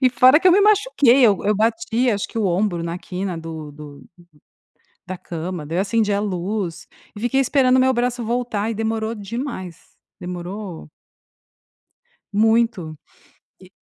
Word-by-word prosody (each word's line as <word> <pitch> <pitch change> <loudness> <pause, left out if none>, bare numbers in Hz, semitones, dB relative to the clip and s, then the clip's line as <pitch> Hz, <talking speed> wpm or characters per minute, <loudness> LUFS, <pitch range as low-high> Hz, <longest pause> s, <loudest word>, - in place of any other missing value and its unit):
E 255 - +6
fora 255 +4 +6
que 370 - 0
eu 360 - +7
me 400 - +5
machuquei, 395 - +4
eu 200 -3 +3
eu 210 0 +2
bati 235 +1 +1
acho 205 -2 -2
que 230 - -5
o 210 - +1
ombro 175 -1 0
na 170 +1 -3
quina 185 0 -5
do 160 -2 -7
do 145 -1 -12 1.0
da 185 -1 -6
cama, 170 -3 -6
daí 165 +4 -3
eu - - +3
acendi 210 0 0
a 200 - +1
luz 185 -2 -3 0.3
e - - -7
fiquei 245 +3 +1
esperando 260 -1 +3
meu 260 0 +4
braço 245 -1 -1
voltar 230 -2 -2
e - - -3
demorou 225 +1 -2
demais, 210 - -6 0.4
demorou 180 0 -7 1.5
muito. 220 -7 +1 0.6
E - - -17
210 Hz, 155 wpm, -21 LUFS, 180-240 Hz, 1.5 s, eu